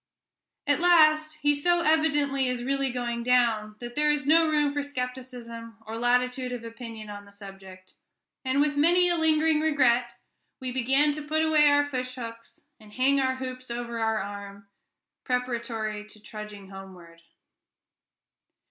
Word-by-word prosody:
At - - +2
last, 310 -3 +4
he 290 0 +4
so 345 +4 +2
evidently 290 -4 +2
is 250 -1 -2
really 275 +1 0
going 240 -1 -3
down, 235 -4 +1
that 240 +1 -8
there 300 0 +3
is 295 -2 -1
no 320 +2 +4
room 295 -2 +1
for 290 - -1
skepticism 250 -4 -7
or 220 +1 -6
latitude 250 +2 0
of 245 -2 -5
opinion 230 -2 -9
on 205 0 -9
the 200 - -17
subject; 195 -2 -13 0.5
and 260 +1 0
with 295 0 +1
many 350 +5 +4
a 345 - +2
lingering 320 -1 +2
regret, 250 -6 +2 0.4
we 260 -2 -4
began 270 +4 +2
to 300 +1 -5
put 310 +2 0
away 305 -2 +5
our 290 0 +3
fish 255 -2 -4
hooks, 230 -2 -9 0.2
and 210 -1 -17
hang 270 +3 +2
our 260 0 0
hoops 255 -1 -7
over 235 -1 -4
our 225 -1 +1
arm, 200 0 -7 0.6
preparatory 235 -4 -3
to 215 - -15
trudging 210 -2 -10
homeward. 180 -4 -12
250 Hz, 155 wpm, -26 LUFS, 225-290 Hz, 0.6 s, away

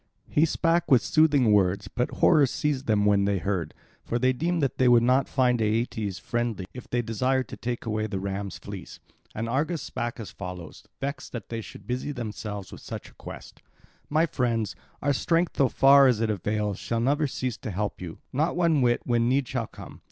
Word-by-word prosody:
He 155 - +4
spake 165 +1 +1
with 130 -4 +5
soothing 145 -7 +4
words; 95 -1 +2
but 125 +5 -1
horror 150 -5 +4
seized 140 0 -2
them 105 -2 +3
when 100 -1 +4
they 100 0 +1
heard. 90 -1 -2 0.3
For 120 - -1
they 130 +1 +2
deemed 165 +4 0
that 135 - -1
they 130 - +4
would 120 -1 +6
not 130 +2 +3
find 125 -3 +2
Aeetes 110 -2 -1
friendly 120 -5 -2
if 125 - -10
they 120 0 0
desired 125 +3 0
to - - -6
take 120 0 -4
away 110 -1 -1
the 100 -2 -3
ram's 100 -1 -4
fleece. - - -9 0.4
And 115 +2 -2
Argus 150 +7 -1
spake 120 0 -4
as 110 - -7
follows, 90 -4 -8
vexed 140 +1 -5
that 115 -5 -6
they 115 -1 -3
should 105 - -12
busy 125 +5 -3
themselves 105 -5 -6
with - - -10
such - - -7
a - - -22
quest: - - -11 0.5
"My 155 +3 +3
friends, 115 - -1 0.3
our 145 +1 +3
strength, 165 +5 +1
so 135 -2 +4
far 140 0 +6
as 125 -4 +3
it 110 -1 +1
avails, 105 0 -2
shall 115 - -2
never 145 +5 +2
cease 130 -3 -3
to - - -6
help 105 +1 -3
you, 85 -3 -7 0.2
not 155 +6 +1
one 170 -5 +3
whit, 120 -1 +2
when 120 -1 +2
need 135 0 +1
shall 120 -4 -2
come. - - -12
120 Hz, 205 wpm, -26 LUFS, 105-135 Hz, 0.5 s, would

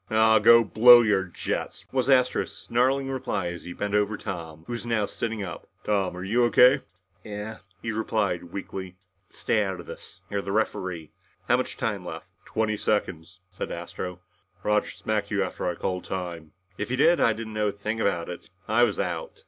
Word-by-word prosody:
"Ahhh 110 0 +5
go 115 0 +7
blow 120 +3 +8
your 100 -4 +2
jets!" 90 - -4
was 130 0 0
Astro's 125 -2 +2
snarling 135 +3 +1
reply 105 -8 -2
as 85 0 -8
he 90 - -6
bent 105 +2 -3
over 105 0 +1
Tom, 80 -5 -6
who 120 - -5
was 120 -3 -4
now 115 -3 0
sitting 115 0 -3
up. 85 -3 -8
"Tom, 95 -4 0
are 90 - -5
you 115 +6 +2
O.K.?" 125 +5 +6 0.4
"Yeah 105 - -10
yeah," 105 +2 -5 0.3
he 115 - -2
replied 105 -5 -1
weakly. 95 0 -7 0.3
"But - - -25
stay 105 - +1
out 95 -2 -3
of - - -9
this. - - -11
You're 100 0 -2
the 100 - -5
referee. 95 -6 -2 0.4
How - - +5
much - - -3
time - - -2
left?" - - -7 0.2
"Twenty 110 -1 -1
seconds," 95 -3 -2
said - - -6
Astro. 90 -1 -6 0.4
"Roger 105 0 +1
smacked 110 -1 -2
you - - +1
after - - -3
I 90 - -3
called 90 +1 -3
time." 85 -4 -5 0.3
"If 105 - -3
he 130 - 0
did, 160 +5 +4
I 115 - +4
didn't 110 0 -7
know 105 0 0
a - - +1
thing 105 +2 -4
about 85 -5 0
it. 90 - -8 0.2
I 110 +3 +3
was 120 -4 +3
out." 85 -3 -3
105 Hz, 195 wpm, -26 LUFS, 90-115 Hz, 0.4 s, blow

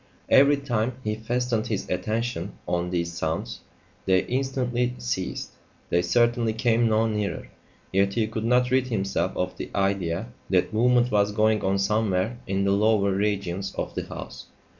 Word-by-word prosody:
Every 140 +1 +6
time 125 -3 -1
he 105 - -1
fastened 115 +1 -1
his 105 -4 -2
attention 110 -1 -2
on 90 0 -1
these 85 -1 -2
sounds, 80 -1 -3 0.5
they 95 0 +3
instantly 125 -2 -1
ceased. 60 0 -3 0.4
They 85 - +3
certainly 120 +5 +2
came 115 0 +2
no 110 +1 +3
nearer. 105 -5 -3 0.4
Yet 100 +1 +2
he 115 - +2
could 110 0 -4
not 125 +1 +3
rid 130 0 +2
himself 100 -4 -1
of 90 0 -2
the - - -6
idea 95 0 0 0.2
that 95 +2 +2
movement 125 +2 +3
was 105 -1 +3
going 110 0 +2
on 95 +1 +1
somewhere 105 +2 0
in 95 0 0
the 100 - +2
lower 100 0 +3
regions 100 -1 -1
of - - -3
the - - -4
house. 65 +1 -8
105 Hz, 160 wpm, -25 LUFS, 95-120 Hz, 0.5 s, Every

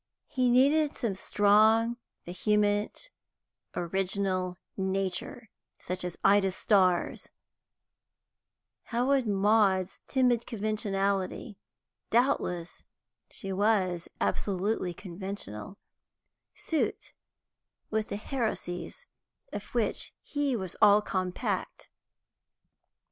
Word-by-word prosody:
He 255 -2 +1
needed 285 +5 +4
some 230 -5 -2
strong, 215 +4 +3 0.3
vehement, 210 - 0 0.6
original 185 0 -1 0.2
nature, 195 +3 -3 0.3
such 180 0 -4
as 180 -1 -5
Ida 200 -1 +5
Starr's; 185 -3 +2 1.6
how 240 +1 0
would 270 -3 +2
Maud's 200 -2 +2
timid 250 -3 +2
conventionality 200 -2 -1 0.5
doubtless 220 -8 0 0.5
she 195 0 -4
was 185 -4 +1
absolutely 190 -2 -1
conventional 190 - -6 0.8
suit 320 - -2 0.8
with 220 0 0
the - - -4
heresies 210 -8 -4 0.5
of - - -5
which - - 0
he 290 -3 -1
was 190 -5 -5
all 210 0 +7
compact? 185 -2 -3
205 Hz, 80 wpm, -29 LUFS, 185-225 Hz, 1.6 s, all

